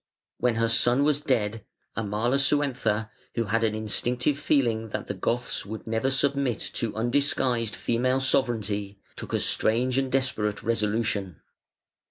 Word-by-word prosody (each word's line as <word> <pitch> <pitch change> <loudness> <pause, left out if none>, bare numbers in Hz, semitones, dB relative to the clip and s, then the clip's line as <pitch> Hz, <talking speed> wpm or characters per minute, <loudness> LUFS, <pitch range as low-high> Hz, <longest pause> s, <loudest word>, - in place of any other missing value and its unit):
When 125 -2 +1
her 115 0 +2
son 120 +3 +3
was 145 0 +2
dead, 115 -6 0 0.3
Amalasuentha, 115 0 0 0.2
who 115 - +1
had 115 +2 0
an 110 -1 +1
instinctive 125 +6 0
feeling 115 -8 +1
that 105 - -4
the - - -4
Goths 120 +6 -2
would 110 +2 -7
never 115 +3 0
submit 135 -2 +1 0.2
to 115 -2 -2
undisguised 120 -2 +1
female 130 +2 0
sovereignty, 110 -7 0 0.2
took - - -7
a - - +1
strange 125 +4 +2
and 135 -1 -2
desperate 110 -6 0
resolution. 105 -5 -1
115 Hz, 135 wpm, -26 LUFS, 110-130 Hz, 0.3 s, son